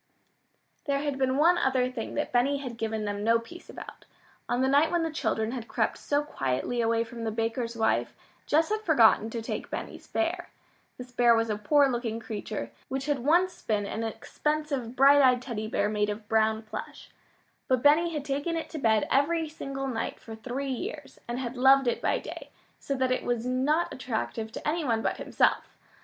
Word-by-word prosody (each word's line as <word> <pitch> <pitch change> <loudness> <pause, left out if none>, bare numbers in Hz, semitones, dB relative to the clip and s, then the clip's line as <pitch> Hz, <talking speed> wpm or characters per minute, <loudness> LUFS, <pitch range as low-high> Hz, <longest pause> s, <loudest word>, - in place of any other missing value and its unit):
There 280 -2 +1
had 285 -2 -2
been 260 0 +1
one 345 +4 +5
other 260 -4 +2
thing 235 -3 -5
that 295 - -2
Benny 255 +4 +2
had 255 -4 -6
given 220 -1 -2
them 205 0 -3
no 230 +1 +4
peace 290 +10 -11
about. - - -10 0.4
On 245 - +1
the - - +3
night 285 +4 +4
when 345 -1 +1
the 325 - -2
children 220 -7 -1
had 240 -3 -5
crept - - -1
so 290 0 0
quietly 185 - -2
away 230 0 +2
from 230 0 -8
the 225 - -1
baker's 230 +2 -2
wife, 220 0 +1 0.3
Jess 320 +2 +3
had 430 0 -1
forgotten 235 - +4
to 230 0 -5
take - - -4
Benny's - - -6
bear. 345 +1 -2 0.5
This 250 0 -9
bear 240 -1 +5
was 225 -1 +1
a - - 0
poor 280 +7 +4
looking 235 -3 -2
creature, 205 - -5 0.2
which 270 0 -3
had 290 -2 0
once 345 +8 +2
been 210 -2 -1
an 220 +2 -4
expensive 280 +1 -3
bright 280 +2 +7
eyed 255 -2 +5
Teddy 230 -4 -5
bear 210 -1 0
made 210 0 0
of 210 0 -5
brown 220 0 +2
plush. 215 - -8 0.6
But 255 -2 +1
Benny 315 +4 +5
had 300 -3 -4
taken 290 +4 -1
it 325 - -5
to 315 - -5
bed 220 -4 +2
every 320 +4 +2
single 275 -3 -5
night 230 -3 -3
for 225 - -10
three 255 +5 -4
years, 370 - -6
and 240 +1 -3
had 250 -1 -4
loved 265 +1 +5
it 240 - 0
by - - +1
day, - - -8 0.3
so 275 - -3
that 260 -1 0
it 255 - 0
was 240 -1 -1
not 270 +7 +1
attractive 220 - -4
to - - -6
any 325 +2 0
one 225 -5 0
but - - 0
himself. - - 0
255 Hz, 200 wpm, -28 LUFS, 225-290 Hz, 0.6 s, bright